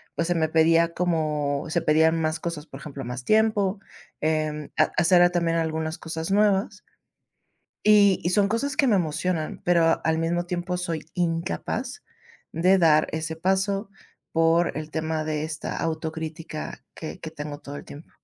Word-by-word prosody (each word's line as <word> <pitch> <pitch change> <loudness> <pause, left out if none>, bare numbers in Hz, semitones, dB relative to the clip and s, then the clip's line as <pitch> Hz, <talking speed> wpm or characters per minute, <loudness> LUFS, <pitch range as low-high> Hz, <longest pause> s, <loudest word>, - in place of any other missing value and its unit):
pues, 165 - -1
se 175 - +2
me 160 -1 +2
pedía 165 +1 +3
como 150 -5 -1
se 170 +1 0
pedían 160 +2 +3
más 155 +1 -1
cosas, 165 -2 -5
por 135 - -10
ejemplo, 140 -2 -7
más 125 0 -6
tiempo, 215 -2 +2 0.4
em, 155 -1 -1
ha 155 - +3
hacer, 175 +1 +5
ah, 175 - +5
también 170 -1 +1
algunas 160 0 -2
cosas 165 +2 -5
nuevas. 200 0 +1 1.0
Y 205 -2 +5
y 175 - +1
son 200 +1 +3
cosas 270 +5 -1
que 275 - +4
me 215 - +4
emocionan, 160 0 -2
pero 170 -2 +3
al 160 0 +2
mismo 170 +1 0
tiempo, 180 0 -2
soy 165 -4 -3
incapaz 180 - -2 0.5
de 180 +4 +4
dar 155 -3 +4
ese 160 0 -3
paso, 195 +3 0 0.4
por 165 +1 +3
el 155 0 -6
tema 160 0 -2
de 155 -1 -2
esta 155 0 -5
autocrítica 160 0 -5
que 160 - -7
que 160 - -6
tengo 150 -2 -7
todo 145 -1 -8
el - - -10
tiempo. 150 +3 -12
165 Hz, 165 wpm, -25 LUFS, 155-180 Hz, 1.0 s, hacer